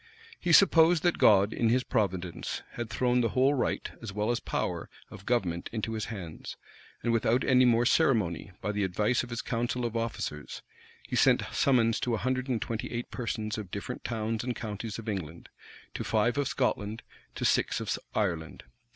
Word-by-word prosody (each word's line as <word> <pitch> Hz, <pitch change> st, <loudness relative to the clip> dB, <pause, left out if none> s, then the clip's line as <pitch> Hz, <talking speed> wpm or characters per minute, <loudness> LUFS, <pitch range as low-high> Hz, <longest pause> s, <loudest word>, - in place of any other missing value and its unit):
He 175 Hz, -, 0 dB
supposed 165 Hz, -2 st, +6 dB
that 175 Hz, -1 st, +2 dB
God, 100 Hz, 0 st, +5 dB
in 115 Hz, -, +1 dB
his 125 Hz, +2 st, +2 dB
providence, 95 Hz, -8 st, -2 dB
had 120 Hz, -1 st, -5 dB
thrown 125 Hz, +1 st, +2 dB
the 115 Hz, -, +1 dB
whole 135 Hz, +2 st, +5 dB
right, 130 Hz, -, -1 dB
as 110 Hz, -3 st, -6 dB
well 105 Hz, +3 st, 0 dB
as 120 Hz, -, 0 dB
power, -, -, -3 dB, 0.2 s
of 95 Hz, -, -12 dB
government 90 Hz, -9 st, 0 dB
into 115 Hz, 0 st, -3 dB
his 110 Hz, -2 st, -2 dB
hands; 90 Hz, -8 st, -7 dB, 0.5 s
and 120 Hz, -, +1 dB
without 115 Hz, +2 st, +2 dB
any 130 Hz, -1 st, +5 dB
more 120 Hz, 0 st, +4 dB
ceremony, 110 Hz, -, +2 dB
by 105 Hz, -, -1 dB
the 105 Hz, 0 st, -1 dB
advice 105 Hz, +6 st, +1 dB
of 120 Hz, -, -7 dB
his 120 Hz, -1 st, -4 dB
council 120 Hz, +1 st, -1 dB
of 115 Hz, -1 st, -3 dB
officers, 115 Hz, -10 st, -4 dB, 0.4 s
he -, -, -3 dB
sent -, -, +4 dB
summons 115 Hz, -4 st, +3 dB
to 120 Hz, -2 st, 0 dB
a -, -, -2 dB
hundred 130 Hz, +2 st, -1 dB
and 125 Hz, -4 st, 0 dB
twenty 115 Hz, -1 st, -4 dB
eight 120 Hz, 0 st, -4 dB
persons 110 Hz, -3 st, -3 dB
of 100 Hz, -4 st, -7 dB
different 100 Hz, +6 st, -6 dB
towns 110 Hz, -1 st, -2 dB
and 125 Hz, -1 st, -2 dB
counties 105 Hz, -1 st, -5 dB
of 115 Hz, -1 st, -9 dB
England, 85 Hz, -6 st, -5 dB, 0.4 s
to -, -, -4 dB
five 110 Hz, +2 st, +1 dB
of 145 Hz, -2 st, 0 dB
Scotland, 110 Hz, -5 st, -1 dB, 0.3 s
to -, -, -2 dB
six -, -, +2 dB
of -, -, -1 dB, 0.2 s
Ireland. 85 Hz, -, -2 dB
115 Hz, 185 wpm, -29 LUFS, 105-125 Hz, 0.5 s, supposed